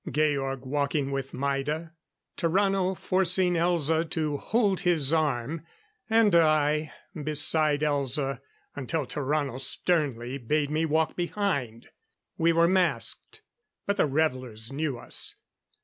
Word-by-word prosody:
Georg 140 -3 -1
walking 140 +1 -1
with 135 -1 -4
Maida; 140 +4 -3 0.4
Tarrano 190 +1 +1
forcing 185 -1 +3
Elza 165 -2 +2
to 155 -3 -2
hold 205 +1 0
his 165 -5 +2
arm; 150 0 -1 0.5
and 220 -4 +4
I, 155 -2 +2 0.2
beside 150 -1 +3
Elza 140 -2 0 0.3
until 145 +2 -3
Tarrano 140 -1 -2
sternly 135 -3 0
bade 145 +4 -1
me 155 +2 0
walk 160 +1 0
behind. 165 - -3 0.5
We 165 +1 +2
were 170 0 +3
masked, 185 0 -1 0.4
but 200 0 -1
the 175 - +2
revelers 130 -6 -2
knew 145 -3 -2
us. - - -2
155 Hz, 115 wpm, -27 LUFS, 140-170 Hz, 0.5 s, and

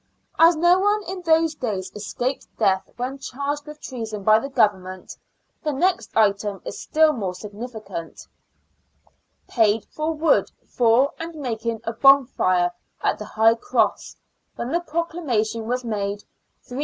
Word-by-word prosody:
As 330 +1 +7
no 345 +3 +4
one 415 +2 +2
in 375 0 -5
those 325 -1 +3
days 205 -10 -4
escaped 245 +5 -3
death 190 0 +1
when 255 +3 -4
charged 285 +3 -4
with 300 0 -10
treason 225 -7 -6
by 215 +2 +6
the 275 - -6
Government, 190 -7 0 0.5
the 305 - -1
next 290 - 0
item 200 -2 +2
is - - -6
still 315 0 +3
more 195 -8 -3
significant: 210 -3 -8 0.5
— - - -45 0.2
" - - -44 0.3
Paid 220 -2 +2
for 310 +1 -3
wood 315 +1 +2 0.2
for 245 +3 +3
and 330 0 -6
making 230 -5 -3
a 230 0 -3
bonfire 240 -10 +4 0.3
at - - +1
the 210 - -6
High 220 +2 +4
Cross, 320 - -1 0.4
when 240 +2 -4
the 340 - +2
proclamation 295 -10 -2
was 250 +1 -1
made, 205 -2 -3 0.4
3s. 250 +2 -7
240 Hz, 150 wpm, -23 LUFS, 210-300 Hz, 0.5 s, As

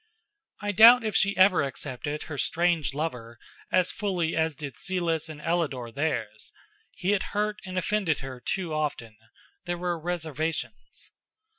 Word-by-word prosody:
I 205 - 0
doubt 230 +4 +8
if 215 -2 -2
she 200 -1 +3
ever 185 -1 +6
accepted 145 +2 -4
her 145 -3 -6
strange 165 -6 +1
lover 125 -7 -4 0.3
as 185 -1 +3
fully 180 -6 -1
as 160 -1 +1
did 140 -3 -7
Celis 170 -4 -1
and 155 -1 -8
Ellador 150 -8 -1
theirs. 115 -7 -3 0.4
He 185 - 0
had 205 -2 +2 0.2
hurt 210 0 0
and 185 0 -5
offended 185 -4 +1
her 130 -2 -7
too 180 0 -2
often; 145 -8 -3 0.5
there 175 0 -2
were 175 -1 -2
reservations. 160 +2 -4
165 Hz, 145 wpm, -27 LUFS, 145-185 Hz, 0.5 s, doubt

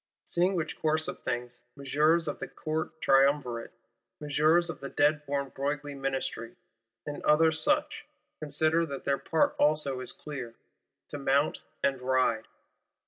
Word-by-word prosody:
Seeing 180 +3 +1
which 165 -2 -3
course 155 0 +1
of - - -5
things, 120 -1 -3 0.2
Messeigneurs 150 +4 +2
of - - -3
the - - -5
Court 160 0 -4
Triumvirate, 135 -3 +2 0.5
Messieurs 155 +4 +3
of 165 - -5
the 140 - -6
dead 150 +1 +2
born 140 -1 -1
Broglie 145 +2 -3
Ministry, 135 -4 -3 0.5
and 145 0 -5
others 160 +1 +3
such, - - +1 0.3
consider 155 +2 +2
that 140 -2 -6
their 140 0 0
part 160 - +1
also 145 -3 +2
is 130 - -3
clear: 130 -6 -7 0.5
to 145 - -6
mount 140 +2 +1 0.2
and 135 -2 +1
ride. 125 -3 +1
145 Hz, 140 wpm, -29 LUFS, 135-155 Hz, 0.5 s, Messieurs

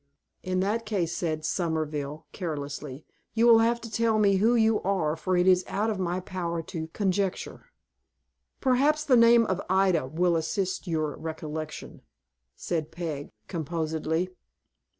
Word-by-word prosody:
"In 185 0 -1
that 215 +4 -1
case," 175 -6 -1
said 155 -3 -2
Somerville, 155 -3 -2
carelessly, 145 -4 -5 0.3
"you 230 +1 +4
will 230 -1 +8
have 235 +1 +2
to 230 - -8
tell 225 0 +2
me 200 -2 +4
who 225 +5 +3
you 220 -1 +3
are, 180 -6 0
for 180 +3 -1
it 180 +1 +3
is 185 -1 +5
out 215 +2 0
of 205 - -3
my 180 0 -1
power 175 -3 -4
to 160 -1 -5
conjecture." 195 - -2 0.9
"Perhaps 285 +4 +2
the 275 -4 +4
name 230 0 +6
of 190 -2 -1
Ida 185 -6 +3
will 170 +4 +1
assist 185 +4 -2
your 155 -3 -1
recollection," 155 -1 -6 0.5
said 160 -3 -3
Peg, 160 -4 -5 0.2
composedly. 160 +1 -2
180 Hz, 145 wpm, -27 LUFS, 160-210 Hz, 0.9 s, will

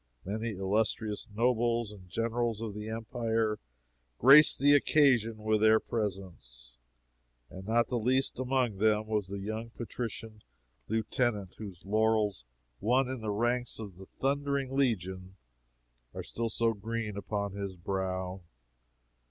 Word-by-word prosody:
Many 110 +3 -3
illustrious 105 +2 -1
nobles 115 0 +1
and 95 -3 -13
generals 115 +1 -1
of 110 -2 -4
the 105 +1 -6
Empire 110 -1 -1 0.6
graced 140 +5 +8
the 145 +1 +5
occasion 130 -6 +4
with 110 0 0
their 110 0 +6
presence, 85 - -5 0.7
and 95 +1 -9
not 115 +1 +3
the 125 - -1
least 130 +3 +1
among 130 -5 0
them 110 +1 +2
was 105 -3 -1
the 100 +1 -5
young 110 +3 -4
patrician 115 -2 -6 0.5
lieutenant 110 -2 -1
whose 95 -5 -9
laurels, 105 - +1 0.3
won 125 +5 +2
in 130 -3 -4
the 110 - -3
ranks 120 +4 0
of 100 -5 -8
the 95 0 -12
"Thundering 140 -1 -1
Legion," 95 -8 -1 0.8
are - - -4
still 115 0 -3
so 115 0 +1
green 110 0 -4
upon 100 0 -3
his 100 -2 -5
brow. 95 0 -3
110 Hz, 130 wpm, -30 LUFS, 100-120 Hz, 0.8 s, graced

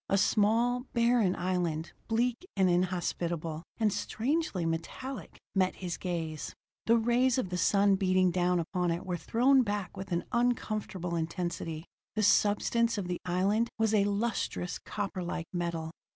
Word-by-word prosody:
A 195 - +3
small, 230 +5 +2
barren 235 -5 +3
island, 175 -3 -1 0.2
bleak 240 +5 0
and 190 -1 +4
inhospitable, 175 -3 -1 0.2
and 215 -3 +2
strangely 245 - -1
metallic, 165 +11 -4 0.2
met 185 -1 +2
his 180 -3 -4
gaze. 165 -4 -4 0.3
The 230 +1 +6
rays 240 +3 +3
of 225 -8 -1
the 180 - -2
sun 195 +2 +4
beating 185 -1 +3
down 180 0 +2
upon 175 +2 -1
it 170 +3 -2
were 180 -1 -2
thrown 245 - +3
back 205 -5 -3
with 190 0 -7
an 170 0 0
uncomfortable 215 -7 -1
intensity; 165 -1 -3 0.3
the 215 - +1
substance 230 +3 +3
of 195 -3 -3
the 180 - -2
island 195 +6 +1
was 220 -1 +2
a 200 -2 +4
lustrous, 205 -3 -1
copperlike 180 -4 -4
metal. 170 -2 -2
190 Hz, 145 wpm, -30 LUFS, 175-225 Hz, 0.3 s, The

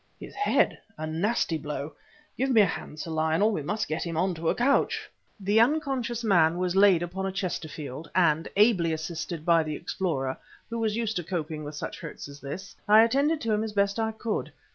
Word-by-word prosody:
"His - - -9
head! 410 - +2 0.2
A 155 - -4
nasty 165 +1 0
blow. 150 0 -5 0.4
Give 265 +1 0
me 230 -4 +6
a - - +6
hand, 155 -3 -5
Sir 165 - -5
Lionel; 160 +7 +2
we 195 - -2
must 210 +9 -2
get 155 - -2
him 165 -2 -4
on 185 +2 +1
to 165 0 -2
a - - +1
couch." 270 +4 +1 0.3
The 205 +3 +2
unconscious 250 -3 +1
man 170 -6 +4
was 180 0 -1
laid 195 -3 +5
upon 190 +3 -3
a - - -2
Chesterfield, 155 -6 -5
and, 165 -3 +3
ably 195 -6 +4
assisted 160 0 -5
by 170 -1 +5
the 155 -1 -3
explorer, 135 -10 -2 0.3
who 230 - -2
was 220 -2 0
used 225 -3 -1
to 175 - -2
coping 160 -3 -4
with 145 0 -7
such - - -5
hurts 165 -3 -8
as 140 0 -11
this, 190 +8 -7
I 215 +2 +8
attended 280 +7 +2
to 225 -1 0
him 210 +1 +1
as 220 -1 -4
best 200 +1 +1
I 220 0 0
could. 220 0 -3
180 Hz, 205 wpm, -27 LUFS, 160-220 Hz, 0.4 s, I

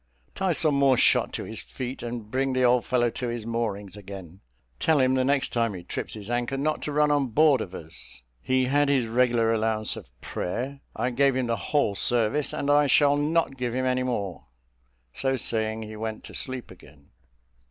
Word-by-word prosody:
Tie 190 -1 0
some 155 -1 +3
more 140 -2 +4
shot - - +4
to - - -4
his - - -7
feet, 130 +1 -6
and 115 -3 -6
bring 135 +1 0
the 130 0 +1
old 125 -1 +4
fellow 120 -2 +2
to 125 - -4
his 120 -2 -4
moorings 105 -4 -3
again. 95 -3 -10 0.4
Tell 160 -2 +3
him, 130 0 +3
the 130 0 +2
next 135 0 +1
time 115 -4 0
he 90 - -8
trips 90 - -4
his 105 -2 -8
anchor, 120 +2 -1
not 155 +3 -1
to 150 - -3
run 150 0 +3
on 145 -2 +2
board 140 +1 +4
of 95 -2 -6
us. 80 -7 -7 0.2
He 130 0 +1
had 145 +2 +2
his 135 -4 +2
regular 115 -1 +2
allowance 110 -1 0
of - - -10
prayer: 130 - -4 0.2
I 125 - -1
gave 135 +2 +3
him 130 -1 0
the 115 -1 0
whole 115 +1 0
service, 120 +7 +1
and 145 - -1
I 145 0 +5
shall 145 +2 +5
not 150 -1 0
give 125 -1 -2
him 130 0 0
any 130 0 +1
more." 105 -8 -3 0.7
So 135 0 0
saying, 110 -2 -1
he 110 0 -8
went 110 0 -5
to - - -11
sleep 130 -1 -1
again. - - -17
125 Hz, 205 wpm, -26 LUFS, 110-135 Hz, 0.7 s, I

